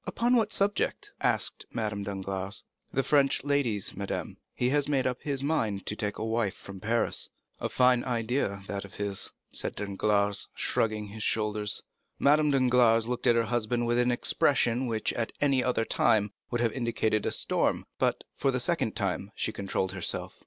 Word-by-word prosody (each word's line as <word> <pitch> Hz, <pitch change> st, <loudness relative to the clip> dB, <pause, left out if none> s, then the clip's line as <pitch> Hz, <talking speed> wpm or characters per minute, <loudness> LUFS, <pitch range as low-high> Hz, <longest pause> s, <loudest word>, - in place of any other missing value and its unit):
"Upon 240 Hz, +2 st, +2 dB
what 220 Hz, -3 st, +2 dB
subject?" 200 Hz, 0 st, 0 dB
asked -, -, 0 dB
Madame 105 Hz, -3 st, -2 dB
Danglars. 95 Hz, -1 st, -3 dB, 0.3 s
"The 135 Hz, -, +1 dB
French 140 Hz, -2 st, +3 dB
ladies, 135 Hz, -8 st, 0 dB
madame. 100 Hz, 0 st, -4 dB, 0.2 s
He 125 Hz, -, +1 dB
has 145 Hz, 0 st, +2 dB
made 135 Hz, -3 st, +2 dB
up 125 Hz, -1 st, -1 dB
his 140 Hz, -2 st, -2 dB
mind 110 Hz, -, 0 dB
to 105 Hz, -, -2 dB
take 105 Hz, -1 st, -2 dB
a -, -, -3 dB
wife 110 Hz, -3 st, 0 dB
from 100 Hz, -1 st, -10 dB
Paris." 115 Hz, +4 st, 0 dB, 0.3 s
"A -, -, -2 dB
fine 125 Hz, -1 st, +4 dB
idea 115 Hz, -4 st, -1 dB
that 100 Hz, 0 st, -4 dB
of 100 Hz, -, -12 dB
his," 100 Hz, -2 st, -1 dB, 0.2 s
said -, -, -3 dB
Danglars, 100 Hz, 0 st, +1 dB
shrugging 105 Hz, -2 st, 0 dB
his 110 Hz, +2 st, -8 dB
shoulders. 105 Hz, -1 st, 0 dB, 0.3 s
Madame 150 Hz, +1 st, +4 dB
Danglars 125 Hz, -4 st, +4 dB
looked 125 Hz, 0 st, -1 dB
at 120 Hz, -, +6 dB
her 115 Hz, -, +3 dB
husband 120 Hz, +1 st, 0 dB
with 120 Hz, +1 st, +2 dB
an 125 Hz, 0 st, +3 dB
expression 125 Hz, 0 st, +2 dB
which, 110 Hz, -2 st, -1 dB
at 115 Hz, -1 st, -2 dB
any 135 Hz, -3 st, +3 dB
other 125 Hz, -3 st, +1 dB
time, 105 Hz, -2 st, +2 dB, 0.2 s
would 120 Hz, -1 st, -1 dB
have 115 Hz, -2 st, +1 dB
indicated 115 Hz, -3 st, 0 dB
a -, -, +1 dB
storm, -, -, +1 dB
but -, -, +1 dB
for 135 Hz, -, 0 dB
the 130 Hz, -1 st, +1 dB
second 125 Hz, -3 st, 0 dB
time 100 Hz, -1 st, -2 dB
she -, -, -1 dB
controlled 95 Hz, -1 st, -2 dB
herself. -, -, -4 dB
115 Hz, 175 wpm, -29 LUFS, 105-130 Hz, 0.3 s, at